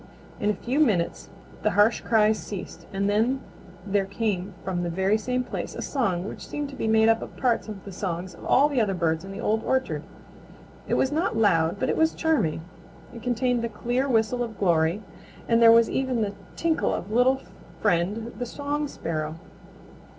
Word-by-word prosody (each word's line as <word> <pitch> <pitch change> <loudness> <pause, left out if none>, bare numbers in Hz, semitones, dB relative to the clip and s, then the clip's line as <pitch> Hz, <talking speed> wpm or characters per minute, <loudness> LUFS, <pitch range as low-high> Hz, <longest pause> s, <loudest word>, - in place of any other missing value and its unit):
In 205 - +1
a 210 - +1
few 260 +5 -2
minutes 205 - +1 0.3
the - - +2
harsh 210 +3 +4
cries 220 -1 +3
ceased 200 -3 -8
and 195 +1 -1
then 225 +6 +2 0.5
there 200 -1 +1
came 200 -2 -2
from 180 -2 -2
the 175 - -2
very 190 +4 +1
same 250 +3 -1
place - - -5
a - - -5
song 195 -9 -1
which - - -8
seemed 295 -1 -4
to 275 - -9
be 225 - -2
made 220 0 +4
up 225 0 +3
of - - -9
parts 245 -4 +1
of 210 -3 -8
the 200 - -7
songs 180 -1 -4
of - - -14
all 280 +3 +5
the 280 -5 +1
other 200 -3 0
birds 160 -1 0
of 195 - -9
the 195 - -7
Old 220 -1 0
Orchard. 260 0 0 0.9
It - - +1
was 265 - +2
not 315 -5 0
loud, 170 -5 +3
but - - 0
it - - 0
was 320 0 +3
charming. 240 - +1 0.5
It 235 - -9
contained 245 0 0
the 235 - -1
clear 245 +5 -1
whistle 230 +1 +2
of 225 -3 -4
Glory, 170 +1 +2 0.4
and 230 0 +3
there 230 -1 +9
was 230 0 +6
even 255 -4 0
the 200 -1 -2 0.2
tinkle 330 -1 +1
of 200 - -6
Little 250 +3 +4 0.4
Friend 205 +7 0
the 245 - -2
Song 290 +3 -2
Sparrow. 155 - -4
220 Hz, 195 wpm, -26 LUFS, 195-250 Hz, 0.9 s, there